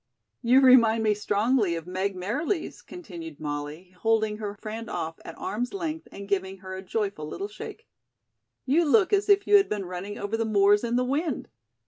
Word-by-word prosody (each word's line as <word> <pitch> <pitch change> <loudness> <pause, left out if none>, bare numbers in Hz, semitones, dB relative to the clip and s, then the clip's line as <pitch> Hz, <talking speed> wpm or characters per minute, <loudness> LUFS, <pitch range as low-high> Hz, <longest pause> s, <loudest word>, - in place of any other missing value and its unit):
"You 255 +2 +5
remind 230 -4 +6
me 215 -1 +3
strongly 210 -1 +1
of 165 -1 -6
Meg 190 +2 -2
Merriles," 290 - -2
continued 170 - -9
Molly, 150 +4 -5
holding 220 -1 +1
her 205 -1 -4
friend 225 +1 -6
off 160 0 -4
at 165 - -9
arms' 245 - -3
length 325 -4 -4
and 200 0 -9
giving 190 -1 -1
her 185 0 -8
a 190 - -6
joyful 195 -5 -3
little 390 - -4
shake. 435 +2 -9 0.8
"You 300 +6 +3
look 370 +6 +3
as 405 +1 +2
if 405 0 +5
you 415 - +7
had 395 - +2
been 205 -2 -2
running 180 +3 -6
over 205 +2 -2
the 225 - 0
moors 205 -1 +4
in 235 0 -1
the 250 +1 +2
wind." 285 +1 -2
215 Hz, 185 wpm, -26 LUFS, 190-265 Hz, 0.8 s, you